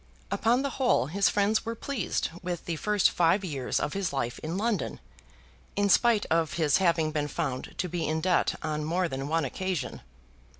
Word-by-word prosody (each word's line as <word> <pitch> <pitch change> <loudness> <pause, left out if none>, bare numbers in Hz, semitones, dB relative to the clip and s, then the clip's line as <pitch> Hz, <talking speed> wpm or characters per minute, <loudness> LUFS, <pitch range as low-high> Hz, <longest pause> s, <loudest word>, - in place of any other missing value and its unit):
Upon 240 +4 +2
the 280 - -1
whole 245 - +3
his 190 +8 +2
friends 205 +2 +2
were 230 0 -4
pleased 235 -8 -2
with 175 -2 -4
the 170 - -2
first 210 +3 +2
five 175 +3 +2
years 140 -7 -1
of 150 - -2
his 195 -2 -1
life 130 -4 -2
in 165 +4 -4
London 220 +1 -1 0.8
in 205 0 +2
spite 225 +2 +4
of 160 -3 +2
his 155 -3 +3
having 170 -4 +2
been 150 -1 -1
found 140 -4 -3
to 185 - -1
be 170 -2 -2
in 155 +1 0
debt 180 +2 +2
on 155 -1 -2
more 175 +4 0
than 135 -2 -4
one 160 0 +1
occasion. 175 0 -3
170 Hz, 185 wpm, -28 LUFS, 155-200 Hz, 0.8 s, spite